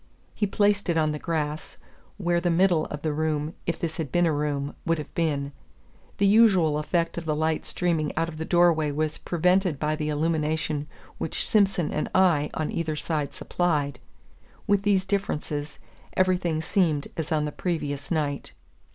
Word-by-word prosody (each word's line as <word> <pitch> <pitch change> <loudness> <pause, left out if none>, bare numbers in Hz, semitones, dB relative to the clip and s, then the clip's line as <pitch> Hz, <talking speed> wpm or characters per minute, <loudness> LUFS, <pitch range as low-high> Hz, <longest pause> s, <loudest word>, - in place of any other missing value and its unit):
He 205 - 0
placed 205 -1 +2
it 170 - +2
on 155 -1 +2
the 150 - -4
grass, 155 -2 -3 0.4
where 175 -3 +1
the 175 - +1
middle 175 -2 +3
of 150 -1 -7
the 155 -2 0
room, 155 0 -1
if 170 - 0
this 160 -2 -4
had 155 -5 -3
been 175 0 +3
a 160 - +2
room, 145 -1 -1
would 165 0 +1
have 150 - -7
been. 145 -4 -1 0.7
The 200 - +3
usual 195 -8 +5
effect 170 +2 -1
of 170 - -10
the 155 -1 0
light 155 +1 0
streaming 165 -4 0
out 165 +1 +1
of 160 -2 -8
the 160 - -3
door 175 +1 +4
way 155 -2 -1
was 155 +1 -2
prevented 180 -1 +2
by 150 +2 0
the 150 0 -2
illumination 155 -1 0 0.3
which 160 - -1
Simson 195 -6 +2
and 150 - -1
I 170 -6 +4
on 155 - -2
either 160 -2 -2
side 150 -1 -2
supplied. 150 -7 -1 0.7
With 200 -1 +3
these 200 -2 +2
differences, 150 -7 -2 0.4
everything 180 -4 +1
seemed 160 -5 +1
as 160 +1 -4
on 150 -1 +2
the 150 - -3
previous 145 -5 -3
night. 150 -4 -2
160 Hz, 175 wpm, -26 LUFS, 150-175 Hz, 0.7 s, usual